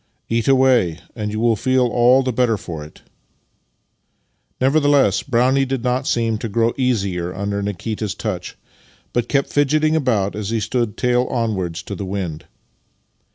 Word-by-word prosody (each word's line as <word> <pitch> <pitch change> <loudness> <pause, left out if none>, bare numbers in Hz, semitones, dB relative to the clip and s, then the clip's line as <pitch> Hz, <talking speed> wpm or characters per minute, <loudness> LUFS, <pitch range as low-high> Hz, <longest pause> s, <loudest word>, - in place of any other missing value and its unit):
" - - -49
Eat 115 - -1
away, 130 -11 +3 0.2
and 105 -2 -3
you 110 - -3
will 115 0 +3
feel 130 +4 +2
all 125 +2 +4
the 130 -1 -1
better 115 -2 +2
for 80 -5 -7
it." 75 - -15 1.6
Nevertheless, 135 -6 +3
Brownie 130 +1 +2
did 130 -2 -2
not 125 +2 0
seem 115 -2 0
to 115 - -4
grow 115 +3 +1
easier 100 -9 -1
under 100 +1 -2
Nikita's 105 +1 -3
touch, 95 -5 -5 0.6
but 120 -1 -1
kept 140 -1 0
fidgeting 155 +2 +2
al^out 115 -10 +1
as 105 -1 -4
he 115 0 0
stood 110 0 -2
tail 125 0 +2
onwards 95 -8 -2
to - - -7
the 100 - -5
wind. 95 -5 -4
115 Hz, 155 wpm, -20 LUFS, 100-130 Hz, 1.6 s, all